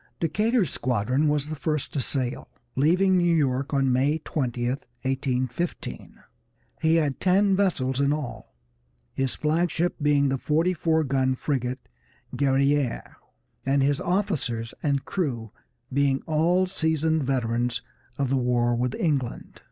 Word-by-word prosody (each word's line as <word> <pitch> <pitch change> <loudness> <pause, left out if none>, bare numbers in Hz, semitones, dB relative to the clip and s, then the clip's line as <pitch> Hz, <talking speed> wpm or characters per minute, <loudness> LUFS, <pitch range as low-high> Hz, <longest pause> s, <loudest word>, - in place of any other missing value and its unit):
Decatur's 210 - +1
squadron 125 +4 0
was 150 -1 +1
the 155 - -4
first 150 -1 -2
to 140 - 0
sail, 130 -2 -2 0.3
leaving 180 +7 +3
New 175 -1 +3
York 135 -3 0
on 135 -2 +2
May 140 +5 +2
20, 125 -5 -2
1815. 130 +3 -3 0.6
He 160 +1 +3
had 150 -5 +1
ten 195 +1 +3
vessels 140 -9 +1
in 140 0 +3
all, 150 - -5 0.6
his 135 -1 -1
flag 165 +3 +1
ship 175 +3 0
being 145 -1 +3
the 135 0 -1
forty 165 +6 +1
four 160 -2 +1
gun 130 -2 +1
frigate 130 -2 -3 0.5
Guerrière, 140 -1 +1 0.5
and 135 0 +2
his 140 +1 +1
officers 155 - -1
and 140 -2 0
crew 120 - -2 0.4
being 140 0 +2
all 170 +4 +2
seasoned 160 -3 0
veterans 120 -2 -1 0.3
of 140 -2 0
the 135 - +2
war 120 -1 +2
with 125 +1 -1
England. 145 - -2
140 Hz, 135 wpm, -25 LUFS, 130-160 Hz, 0.6 s, leaving